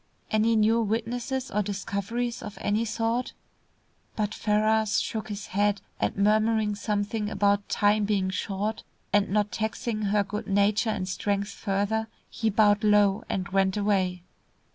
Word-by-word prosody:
Any 220 +1 +3
new 220 +2 +3
witnesses 235 +4 -2
or 210 - +1
discoveries 205 +4 -3
of 210 - -8
any 210 +3 0
sort?" 230 +2 -1 0.8
But 210 -1 -1
Ferrars 215 0 +2
shook 220 -1 -4
his 205 0 -5
head, 205 +1 +1 0.2
and - - -1
murmuring 215 +1 +2
something 210 +1 -2
about 200 -1 +1
time 205 0 +2
being 195 -2 0
short, 205 +3 -3 0.3
and 205 -1 +3
not 210 +1 +1
taxing 220 +2 -2
her 205 +1 +2
good 210 +2 -5
nature 205 +3 +2
and 185 -3 -2
strength 200 +2 -1
further, 205 +2 -1 0.2
he 225 -2 0
bowed 210 0 +3
low, 205 -1 +4
and 185 -2 -2
went 190 0 +1
away. 190 -4 0
210 Hz, 140 wpm, -27 LUFS, 200-220 Hz, 0.8 s, low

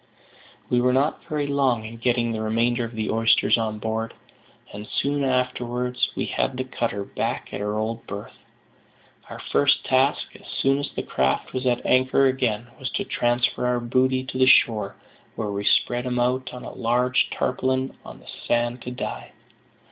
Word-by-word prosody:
We 120 0 +2
were 125 0 +3
not 140 +4 +1
very 150 -3 -1
long 135 -5 +1
in 115 +1 -8
getting 120 0 +1
the 110 -1 -3
remainder 115 +3 +1
of 115 0 -8
the 110 -1 -1
oysters 115 0 +4
on 110 -2 -2
board, 110 +1 -3 0.6
and 105 +1 -7
soon 145 0 0
afterwards 125 -1 0
we - - -1
had 130 - -1
the 130 - -1
cutter 115 -5 -2
back - - -3
at - - -3
her 105 +1 -1
old 115 +1 -3
berth. 100 +1 -7 1.0
Our - - -7
first 145 0 +3
task, 130 +2 +2
as - - -14
soon 135 +1 +1
as 145 - -3
the - - -5
craft 65 0 0
was 130 0 -1
at 120 -1 +1
anchor 130 +1 +4
again, 125 -3 0
was 130 - -3
to 200 - 0
transfer 125 -5 0
our 125 0 +1
booty 130 +2 +1
to 130 0 -5
the 130 - +5
shore, 105 -6 +4 0.4
where 110 -2 -3
we 100 0 -3
spread 120 +4 +2
them 125 -1 -1
out 125 +1 0
on 125 - -8
a - - -7
large 125 +2 +1
tarpaulin 130 +1 -1
on - - -10
the - - -16 0.2
sand 120 +1 +1
to 125 - -6
die. 125 - -6
125 Hz, 180 wpm, -24 LUFS, 115-130 Hz, 1.0 s, the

